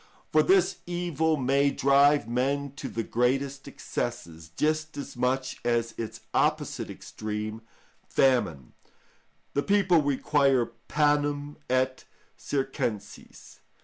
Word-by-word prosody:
For - - +5
this 380 0 +3
evil 170 -3 0
may 140 +1 +2
drive 140 -1 +4
men 135 +4 -1
to - - -5
the 115 - -3
greatest 135 +4 0
excesses, 80 0 -5
just 155 0 0
as 140 - -6
much 130 +1 -1
as 115 -1 0
its 115 -2 -6
opposite - - 0
extreme, 110 +1 -5 0.5
famine: 100 - +1 0.8
the 140 - +1
people 185 -2 +3
require 140 -2 +2 0.2
panem 145 -1 +1
et 130 0 0 0.3
circenses. 135 -6 -4
135 Hz, 105 wpm, -27 LUFS, 120-145 Hz, 0.8 s, For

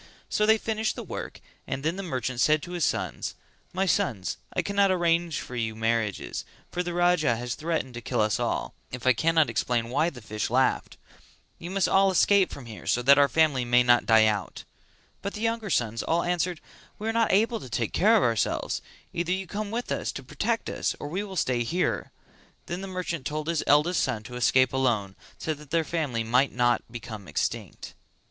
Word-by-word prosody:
So 210 - +1
they 220 0 +6
finished 220 0 -1
the - - -6
work - - -7 0.3
and 135 - -3
then 160 +3 0
the 195 - -4
merchant 130 -8 -3
said 155 +2 +3
to 175 - -7
his 175 -2 -2
sons: - - -1 0.4
"My 190 +2 0
sons 135 - 0
I - - -1
cannot 200 -1 +2
arrange 170 -3 +1
for 125 - -8
your 110 -2 -2
marriages, 110 -2 -1 0.3
for 180 - -1
the 175 -1 -4
Raja 175 -7 +3
has 120 +1 -3
threatened 155 -5 -2
to 120 - -6
kill - - -2
us 105 -1 +2
all, - - -2 0.2
if 125 -1 -7
I 130 - +6
cannot 160 +4 +3
explain 120 -1 -1
why 160 +6 +2
the 130 - -11
fish 105 -1 -4
laughed; 130 +3 +1 0.6
you 175 - -7
must 195 -1 +1
all 195 0 +4
escape 190 +1 +4
from 135 - -8
here 110 -2 -10
so 125 - +1
that 140 +3 +7
our 140 - +6
family 155 -5 +3
may 125 +1 +4
not 120 -1 +4
die 110 -1 +6
out;" 105 -6 -1 0.6
but 200 +2 -4
the 210 - -6
younger 225 -2 -1
sons 115 - 0
all 170 +1 +1
answered 175 -1 -1 0.4
"We 215 - -5
are 225 - 0
not 230 0 +2
able 225 +4 +2
to 130 - -10
take 115 -1 -2
care 220 +4 +5
of - - +2
ourselves, 115 -3 0 0.3
either 175 0 -1
you 190 +1 -1
come 205 +2 -4
with 235 +3 -4
us - - -1
to - - -7
protect - - -2
us - - -1
or 145 - -5
we 185 +6 -2
will 195 -2 -8
stay 125 -8 +1
here." 170 +10 -1 0.5
Then 175 +2 -4
the 195 - -5
merchant 180 -6 -3
told 155 +1 -4
his 165 -2 0
eldest 150 +5 +4
son 115 -5 -1
to 125 +2 -9
escape 130 +1 +3
alone 115 -8 0 0.2
so 160 - -2
that 150 -1 -13
their 165 +1 +2
family 150 -9 -2
might 125 +5 +2
not 120 -1 +2
become 110 -4 -8
extinct. 75 - -3
150 Hz, 210 wpm, -27 LUFS, 120-180 Hz, 0.6 s, that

